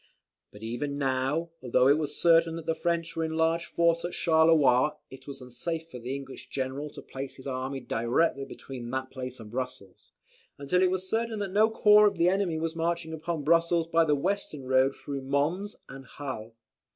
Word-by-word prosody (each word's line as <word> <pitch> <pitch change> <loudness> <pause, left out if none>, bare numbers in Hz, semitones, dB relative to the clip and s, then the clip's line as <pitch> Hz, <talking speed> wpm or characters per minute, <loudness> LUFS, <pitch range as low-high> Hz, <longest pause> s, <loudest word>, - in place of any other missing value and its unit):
But 105 +1 -13
even 140 +5 -3
now, 135 +5 0
though 125 0 +3
it 145 +3 +5
was 150 -1 -4
certain 165 -1 +4
that 165 -1 -7
the 165 - +1
French 170 0 -2
were 165 - -1
in 160 0 -2
large 165 +1 +2
force 170 0 +2
at 175 - -4
Charleroi 155 -4 +4 0.2
it 135 +1 -13
was 140 - -8
unsafe 160 +6 -5
for 125 - -7
the 125 +3 -4
English 135 -1 -9
general 135 +2 -3
to - - -10
place 135 +1 -7
his 130 - -13
army 135 0 -3
directly 125 +6 0
between 130 -3 -8
that 130 +1 -3
place 130 -1 -6
and 110 -2 -11
Brussels, 125 -6 -6 0.5
until 145 +6 +1
it 185 - +4
was 185 0 -2
certain 225 +1 -1
that 200 -2 -3
no 215 +2 +5
corps 210 -1 +6
of 200 -3 -1
the 170 +1 +4
enemy 190 -4 0
was 160 +1 -2
marching 165 0 -2
upon 160 -1 -3
Brussels 170 +2 +3
by 165 0 +3
the 150 -2 +2
western 155 -2 -2
road 130 +1 +3
through 140 -1 -6
Mons 150 +10 -1
and 135 -1 -11
Hal. 120 -6 -6
150 Hz, 195 wpm, -28 LUFS, 130-170 Hz, 0.5 s, corps